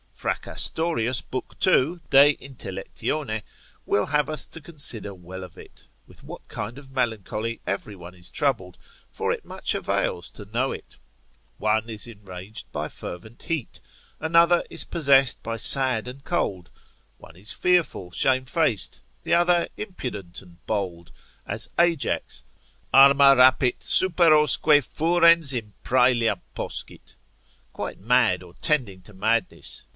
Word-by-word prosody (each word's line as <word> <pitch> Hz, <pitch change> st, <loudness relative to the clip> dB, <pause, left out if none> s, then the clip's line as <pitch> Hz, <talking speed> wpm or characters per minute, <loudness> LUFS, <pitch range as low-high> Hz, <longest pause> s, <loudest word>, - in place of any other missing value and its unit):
Fracastorius, 130 Hz, -7 st, -2 dB
l. 130 Hz, -, -1 dB, 0.2 s
2. 175 Hz, -1 st, +2 dB
de 140 Hz, +1 st, +7 dB
intellect. 100 Hz, -8 st, -10 dB, 0.9 s
will 100 Hz, -, +1 dB
have 150 Hz, 0 st, +1 dB
us 155 Hz, -3 st, +4 dB
to 165 Hz, -, -12 dB
consider 135 Hz, -, 0 dB
well 95 Hz, +1 st, -10 dB
of 90 Hz, -4 st, -13 dB
it, -, -, -16 dB, 0.2 s
with -, -, -19 dB
what -, -, -11 dB
kind 110 Hz, +4 st, -6 dB
of 135 Hz, -2 st, -14 dB
melancholy 115 Hz, -2 st, -3 dB
every 100 Hz, +1 st, -4 dB
one 90 Hz, -1 st, -12 dB
is 90 Hz, -1 st, -8 dB
troubled, 115 Hz, -11 st, -2 dB, 0.3 s
for -, -, -2 dB
it -, -, -5 dB
much -, -, -4 dB
avails 85 Hz, -, -2 dB
to 105 Hz, -, -11 dB
know 120 Hz, +6 st, -2 dB
it; -, -, -10 dB, 0.6 s
one 110 Hz, +2 st, 0 dB
is 110 Hz, -2 st, -2 dB
enraged 100 Hz, -2 st, -11 dB
by -, -, -4 dB
fervent 110 Hz, +7 st, -10 dB
heat, 160 Hz, -7 st, -4 dB, 0.4 s
another 170 Hz, +2 st, +3 dB
is -, -, +2 dB
possessed 135 Hz, -5 st, +2 dB
by 115 Hz, 0 st, -5 dB
sad 130 Hz, -1 st, +6 dB
and 130 Hz, +2 st, -10 dB
cold; 95 Hz, -, -2 dB, 0.5 s
one 80 Hz, -, -16 dB
is 100 Hz, +5 st, -4 dB
fearful, 175 Hz, -, 0 dB
shamefaced; 130 Hz, -, 0 dB, 0.2 s
the -, -, -1 dB
other 175 Hz, 0 st, +3 dB
impudent 125 Hz, -, -7 dB
and 85 Hz, -3 st, -20 dB
bold; 90 Hz, -5 st, -4 dB, 0.4 s
as -, -, -1 dB
Ajax, 170 Hz, -4 st, 0 dB, 0.5 s
Arma 140 Hz, 0 st, +7 dB
rapit 130 Hz, 0 st, +4 dB
superosque 155 Hz, -4 st, +5 dB
furens 165 Hz, 0 st, +4 dB
inpraelia 120 Hz, +1 st, 0 dB, 0.2 s
poscit: -, -, -6 dB, 0.6 s
quite -, -, -6 dB
mad 110 Hz, -4 st, +2 dB
or 90 Hz, -1 st, -15 dB
tending 120 Hz, -12 st, -1 dB
to 105 Hz, -, -17 dB
madness. 110 Hz, +2 st, -2 dB
125 Hz, 130 wpm, -24 LUFS, 100-150 Hz, 0.9 s, de